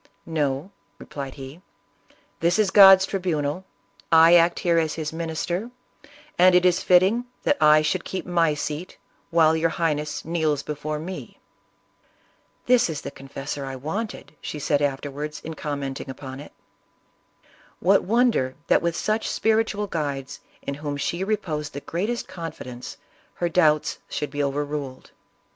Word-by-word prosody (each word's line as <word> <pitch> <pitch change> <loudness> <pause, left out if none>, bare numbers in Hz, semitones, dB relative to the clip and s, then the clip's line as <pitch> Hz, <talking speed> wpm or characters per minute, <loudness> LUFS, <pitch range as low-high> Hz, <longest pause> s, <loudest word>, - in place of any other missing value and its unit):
"No," 150 +1 -2 0.3
replied 140 +2 -7
he, 135 +5 -10 0.8
"this 170 +3 +2
is 210 -3 +2
God's 195 -2 +9
tribunal; 180 -3 -2 0.5
I 165 +1 +7
act 170 0 +5
here 170 -1 +3
as 160 -2 -1
his 155 -1 -4
minister, 170 +6 -3 0.7
and 180 0 +7
it 180 0 +4
is 180 +1 +3
fit 180 -1 +6
ting 225 +6 +1 0.2
that 290 - +3
I 155 0 +6
should 170 +4 0
keep 190 - -5
my 170 -4 +2
seat 150 +4 -5 0.3
while 160 -1 +4
your 165 +1 +1
Highness 150 -2 -2
kneels 155 -3 0
before 150 +1 -4
me." 180 +5 -8 0.6
" - - -39
This 245 -5 +4
is 150 -2 -4
the - - -6
confessor 135 +1 -6
I 135 -1 -5
wanted," 155 - -5
said 145 -1 -1
she - - -1
afterwards 145 +2 -4
in 160 - -6
commenting 140 -3 -5
upon 130 0 -8
it. 145 - -11 1.3
What 195 +3 +4
wonder 225 - +2
that - - +3
with 170 -1 -1
such 215 +4 -1
spiritual 220 -2 +1
guides, 140 -6 -4 0.2
in 140 - -3
whom 145 0 -4
she 170 +5 -2
reposed 165 -8 -2
the 140 - -5
greatest 210 +11 -3
confidence, 125 -7 -8 0.4
her 175 - -1
doubts 155 -3 +2
should 150 - -3
be 145 - -2
overruled. 145 -1 -3
160 Hz, 150 wpm, -24 LUFS, 145-180 Hz, 1.3 s, God's